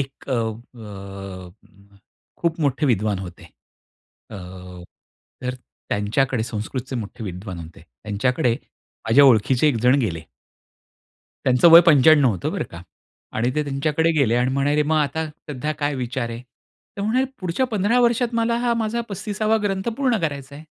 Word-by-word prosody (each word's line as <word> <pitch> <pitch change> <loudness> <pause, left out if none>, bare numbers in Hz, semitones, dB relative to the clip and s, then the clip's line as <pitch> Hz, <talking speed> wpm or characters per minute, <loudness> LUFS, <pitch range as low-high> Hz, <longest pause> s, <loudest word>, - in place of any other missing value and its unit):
एक 135 0 -7
अ, - - -1
अ, 100 -4 -8 0.4
खूप 170 -1 -1
मोठे 140 0 +1
विद्वान 105 -5 +1
होते. 90 -2 -9 0.9
अ, 110 - -7 1.1
तर 125 0 -2 0.3
त्यांच्याकडे 115 +4 0
संस्कृतचे 120 +4 -5
मोठे 110 0 -6
विद्वान 95 -1 -6
होते. 80 0 -11 0.2
त्यांच्याकडे 115 +3 0 0.5
माझ्या 130 +6 +6
ओळखीचे 130 +3 +4
एकजण 125 -1 +3
गेले. 85 -10 -2 1.2
त्यांचं 130 +6 +5
वय 165 +1 +11
95 145 -3 +6
होतं 95 -6 -3
बरं - - -2
का 85 - -9 0.6
आणि 120 +3 +1
ते 150 - +1
त्यांच्याकडे 150 +3 0
गेले. 140 -7 +2
आणि 125 +1 +1
म्हणाले, 145 +2 +2
"मग 155 +2 0
आता 155 +1 0 0.3
सध्या 150 +2 -3
काय 145 -1 -1
विचार 125 -2 -3
आहे?" 115 +1 -7 0.5
तर 200 - -3
म्हणाले, 235 +6 +1 0.2
"पुढच्या 185 +8 -1
15 220 0 +1
वर्षात 240 0 +2
मला 230 0 +1
हा 240 0 +1
माझा 230 +1 -1
35 205 +1 -6
वा 215 +1 +3
ग्रंथ 195 +1 -1
पूर्ण 260 -4 +2
करायचा 140 -3 -4
आहे. 150 +2 -11
135 Hz, 145 wpm, -22 LUFS, 110-165 Hz, 1.2 s, वय